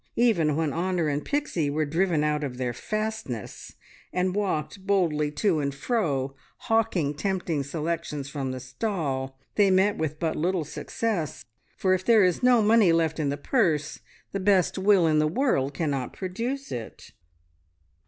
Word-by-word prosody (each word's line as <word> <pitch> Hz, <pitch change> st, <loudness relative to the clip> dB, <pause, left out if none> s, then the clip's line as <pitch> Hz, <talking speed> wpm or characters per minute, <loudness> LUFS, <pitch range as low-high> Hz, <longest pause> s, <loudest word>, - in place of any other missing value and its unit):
Even 175 Hz, -11 st, +3 dB
when 155 Hz, -3 st, 0 dB
Honor 175 Hz, -1 st, 0 dB
and 145 Hz, +1 st, -1 dB
Pixie 280 Hz, -, -1 dB
were 155 Hz, +2 st, 0 dB
driven 165 Hz, 0 st, +1 dB
out 150 Hz, 0 st, 0 dB
of 130 Hz, -3 st, -4 dB
their 125 Hz, -1 st, -2 dB
fastness, 215 Hz, -, -5 dB, 0.4 s
and 180 Hz, 0 st, 0 dB
walked 190 Hz, -1 st, -2 dB
boldly 165 Hz, -7 st, +2 dB
to 180 Hz, -1 st, +1 dB
and 140 Hz, -1 st, -2 dB
fro, 140 Hz, -, -1 dB, 0.3 s
hawking 220 Hz, -10 st, +1 dB
tempting 170 Hz, -1 st, -1 dB
selections 150 Hz, -1 st, -3 dB
from 140 Hz, -2 st, -4 dB
the 130 Hz, -, -5 dB
stall, 135 Hz, -, -3 dB, 0.2 s
they 205 Hz, -2 st, +5 dB
met 190 Hz, +2 st, +3 dB
with 155 Hz, -1 st, -2 dB
but 160 Hz, -2 st, -1 dB
little 175 Hz, 0 st, 0 dB
success, 175 Hz, -, -3 dB, 0.3 s
for 185 Hz, -1 st, +2 dB
if 185 Hz, 0 st, 0 dB
there 220 Hz, -1 st, +5 dB
is 180 Hz, -2 st, +2 dB
no 250 Hz, -3 st, +5 dB
money 215 Hz, -4 st, +5 dB
left 165 Hz, -1 st, +1 dB
in 145 Hz, -2 st, 0 dB
the 140 Hz, -, -2 dB
purse, 155 Hz, -, 0 dB, 0.3 s
the 195 Hz, -, -2 dB
best 190 Hz, -2 st, +3 dB
will 190 Hz, -2 st, +4 dB
in 155 Hz, -1 st, +3 dB
the 155 Hz, -, +3 dB
world 155 Hz, -, 0 dB
cannot 140 Hz, -6 st, -2 dB
produce 235 Hz, +9 st, -4 dB
it. 115 Hz, -3 st, -7 dB
165 Hz, 160 wpm, -26 LUFS, 145-200 Hz, 0.4 s, they